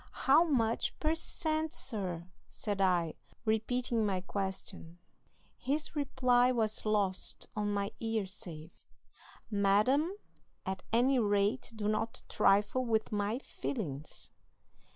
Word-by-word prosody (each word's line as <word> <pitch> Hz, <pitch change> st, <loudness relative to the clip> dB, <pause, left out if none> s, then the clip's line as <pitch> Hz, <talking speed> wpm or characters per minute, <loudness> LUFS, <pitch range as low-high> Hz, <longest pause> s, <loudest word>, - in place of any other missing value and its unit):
"'How 295 Hz, +4 st, +5 dB
much 235 Hz, -8 st, 0 dB
per 310 Hz, 0 st, +2 dB
cent, 315 Hz, 0 st, -2 dB
sir?' 180 Hz, -7 st, -4 dB, 0.2 s
said 205 Hz, -2 st, -3 dB
I, 175 Hz, -4 st, +2 dB, 0.3 s
repeating 230 Hz, +2 st, +1 dB
my 195 Hz, -3 st, 0 dB
question. 190 Hz, -3 st, -5 dB, 0.6 s
"His 295 Hz, +5 st, -1 dB
reply 255 Hz, -3 st, +3 dB
was 220 Hz, -3 st, -1 dB
lost 200 Hz, -3 st, 0 dB
on 210 Hz, -1 st, 0 dB
my 200 Hz, 0 st, -1 dB
ear 225 Hz, -2 st, -1 dB
save: 175 Hz, -5 st, -9 dB, 0.8 s
'Madam, 210 Hz, -, +3 dB, 0.5 s
at 190 Hz, 0 st, -3 dB
any 250 Hz, +3 st, +4 dB
rate 205 Hz, +3 st, +1 dB
do 210 Hz, -1 st, -2 dB
not 215 Hz, +1 st, -1 dB
trifle 210 Hz, +6 st, +3 dB
with 220 Hz, -3 st, 0 dB
my 205 Hz, +2 st, 0 dB
feelings.' 160 Hz, -, -5 dB
215 Hz, 110 wpm, -33 LUFS, 195-250 Hz, 0.8 s, How